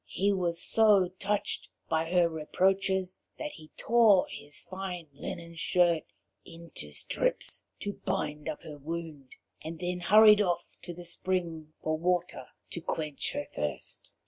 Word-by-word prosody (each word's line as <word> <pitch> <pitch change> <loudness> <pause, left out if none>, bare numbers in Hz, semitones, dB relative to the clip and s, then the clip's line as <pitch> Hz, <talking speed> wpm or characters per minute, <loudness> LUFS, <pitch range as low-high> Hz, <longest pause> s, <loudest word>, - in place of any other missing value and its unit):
He 200 +1 +2
was 175 -3 0
so 205 -4 +4
touched 205 +1 -1 0.2
by 160 0 0
her 175 -1 +4
reproaches 185 +3 +1 0.2
that 300 -1 -4
he 155 -1 -13
tore 225 -5 +5
his 145 0 -7
fine 185 -3 -6
linen 170 +4 -7
shirt 170 0 +3 0.4
into 165 - -7
strips 75 - -1 0.2
to 205 - -2
bind 150 -5 -2
up 155 - -5
her 150 -2 -9
wound, 155 -3 -6 0.3
and 160 +1 -6
then 180 +1 -2
hurried 210 +4 +7
off 175 -3 -1
to 175 - -7
the 175 - -8
spring 170 -3 -2
for 155 0 0
water 180 +1 0 0.2
to 170 - -3
quench 155 -3 -2
her 290 0 -2
thirst. - - -4
175 Hz, 145 wpm, -30 LUFS, 160-190 Hz, 0.4 s, hurried